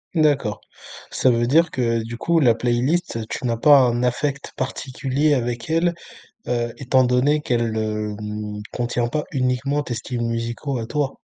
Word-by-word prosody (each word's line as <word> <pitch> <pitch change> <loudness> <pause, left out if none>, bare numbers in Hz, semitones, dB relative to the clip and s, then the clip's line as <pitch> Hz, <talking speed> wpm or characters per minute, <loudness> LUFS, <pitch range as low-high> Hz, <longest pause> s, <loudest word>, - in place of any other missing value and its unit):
D'accord. 140 - +2 0.5
Ça 130 - +2
veut 120 0 +2
dire 165 +6 +4
que, 115 -2 0
du 115 +1 -6
coup, 170 +5 +2
la 120 -6 +4
playlist, 125 +6 0
heu, 110 - -4
tu 130 - -4
n'as 115 -1 0
pas 145 +3 +7
un 120 -1 +2
affect 140 +3 -1
particulier 135 +3 -1
avec 120 -1 -2
elle, 170 +2 +2 0.5
heu, 120 -1 -1
étant 130 -1 +3
donné 125 +5 +2
qu'elle, 115 -5 0
hem, 105 -1 -3
contient 120 -1 -1
pas 150 +3 -2
uniquement 135 +2 0
tes 120 - -4
styles 120 +1 -4
musicaux 115 +3 -2
à 115 - -4
toi? 145 0 -2
125 Hz, 165 wpm, -22 LUFS, 115-140 Hz, 0.5 s, pas